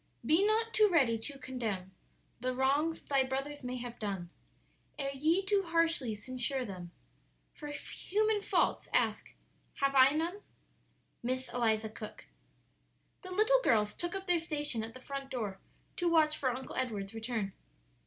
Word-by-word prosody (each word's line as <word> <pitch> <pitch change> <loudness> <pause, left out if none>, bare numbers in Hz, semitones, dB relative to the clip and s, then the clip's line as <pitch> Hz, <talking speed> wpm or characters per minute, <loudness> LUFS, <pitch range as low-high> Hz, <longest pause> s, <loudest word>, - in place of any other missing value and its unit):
"Be 320 +9 +4
not 445 +2 +2
too 425 -1 +6
ready 255 -9 +4
to 275 +5 -4
condemn 225 -8 -4 0.5
The 255 +1 -1
wrongs 285 +5 +1
thy 275 -2 +2
brothers 275 +2 -3
may 250 0 -3
have 240 -1 -7
done; 195 -5 -3 0.7
Ere 275 -1 -2
ye 320 +8 +2
too 400 0 +3
harshly 330 - +1
censure 255 +4 -2
them 180 -4 -7 0.6
For 295 - -8
human 415 +8 -1
faults, - - +1
ask, - - +1 0.4
'Have 275 -1 +1
I 265 -1 +8
none?'" 340 +6 -1 0.8
Miss 255 +2 -2
Eliza 220 -3 +1
Cook. 215 0 -9 1.0
The 370 - -9
little 435 +7 +4
girls 210 - +3
took 345 +2 -2
up 385 0 -4
their 355 -2 +4
station 295 -8 -1
at 225 +2 -7
the 255 - -10
front 275 0 -5
door 210 -7 -3 0.4
to 350 -1 +2
watch 310 -2 +4
for 265 - 0
"Uncle 255 +1 -5
Edward's" 210 -5 -2
return. 225 -3 -3
265 Hz, 155 wpm, -33 LUFS, 230-330 Hz, 1.0 s, I